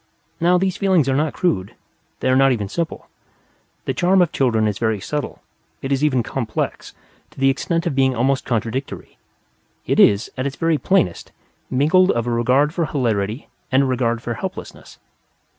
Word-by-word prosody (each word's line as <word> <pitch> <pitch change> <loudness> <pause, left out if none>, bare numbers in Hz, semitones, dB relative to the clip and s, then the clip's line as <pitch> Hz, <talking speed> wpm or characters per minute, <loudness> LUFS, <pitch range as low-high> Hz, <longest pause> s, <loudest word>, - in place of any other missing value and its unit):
Now, 175 +2 +3
these 190 0 -1
feelings 185 -8 +2
are 135 - +1
not 150 +1 0
crude; 100 - -1 0.5
they 130 - +1
are 130 - +4
not 135 0 +5
even 105 -5 -1
simple. 165 +10 -4 0.8
The - - -1
charm 185 +2 +3
of 170 - -2
children 115 -5 +1
is 105 -2 -3
very 110 -3 0
subtle; 145 +8 -5 0.4
it 135 - -3
is 135 +1 +1
even 130 -5 +2
complex, 115 -2 -4 0.3
to - - -16
the 135 0 +4
extent 165 +5 -2
of 170 - -1
being 135 -1 +2
almost 130 +3 +1
contradictory. 120 +3 -4 0.7
It - - 0
is, 100 +3 +4
at 130 - 0
its 140 - -5
very 165 -1 +1
plainest, 140 - 0 0.4
mingled 155 +8 +3
of 120 0 +1
a 120 - -2
regard 125 +6 +2
for 170 -3 -1
hilarity 115 -4 -2 0.2
and 135 +1 +4
a - - +1
regard 120 -3 -1
for 120 - -3
helplessness. 110 - -8
135 Hz, 175 wpm, -20 LUFS, 115-155 Hz, 0.8 s, not